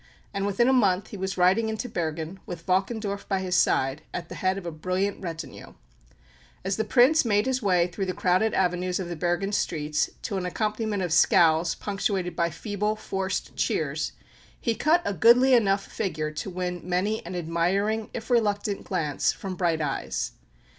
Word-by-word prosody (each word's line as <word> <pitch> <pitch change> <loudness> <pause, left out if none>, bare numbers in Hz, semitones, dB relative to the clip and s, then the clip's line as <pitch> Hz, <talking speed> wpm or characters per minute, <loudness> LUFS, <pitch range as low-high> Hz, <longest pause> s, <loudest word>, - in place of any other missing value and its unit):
And 200 0 -1
within 205 +4 +2
a 265 - +4
month 200 -6 +2
he - - -8
was 190 0 -3
riding 190 +5 +3
into 220 +3 -3
Bergen, 165 -2 -4
with 170 -1 -7
Valkendorf 200 +2 -1
by 195 - +1
his 185 -1 -1
side, 135 -3 +2
at 170 -1 -5
the - - -6
head 185 +1 +1
of 195 - -7
a 170 - -3
brilliant 185 +5 -2
retinue. 165 -3 -7 0.9
As 195 0 0
the 220 - +1
Prince 255 +8 +5
made 210 -2 +2
his 260 -1 0
way 180 -5 +3
through 185 +2 -4
the 185 - -2
crowded 185 +4 +2
avenues 180 0 0
of 180 -2 -4
the 175 - -4
Bergen 175 +4 -1
streets 150 -6 0
to 200 - -2
an 185 - -2
accompaniment 215 +1 -1
of 175 -3 -1
scowls 165 0 +4
punctuated 195 -4 -2
by 170 0 +1
feeble, 210 +4 -2
forced 195 -2 -3
cheers, - - -1 0.5
he 230 - 0
cut 325 +8 +2
a 200 - 0
goodly 240 - +6
enough 200 -4 +3
figure 155 -5 -3
to 155 +5 -5
win 180 -1 -3
many 185 +5 -1
an 180 +2 -6
admiring, 180 +6 0
if 235 +2 -6
reluctant, 205 -3 +1
glance 155 -7 0
from 190 -1 -6
bright 170 -3 0
eyes. 145 -2 -2
190 Hz, 180 wpm, -26 LUFS, 175-210 Hz, 0.9 s, goodly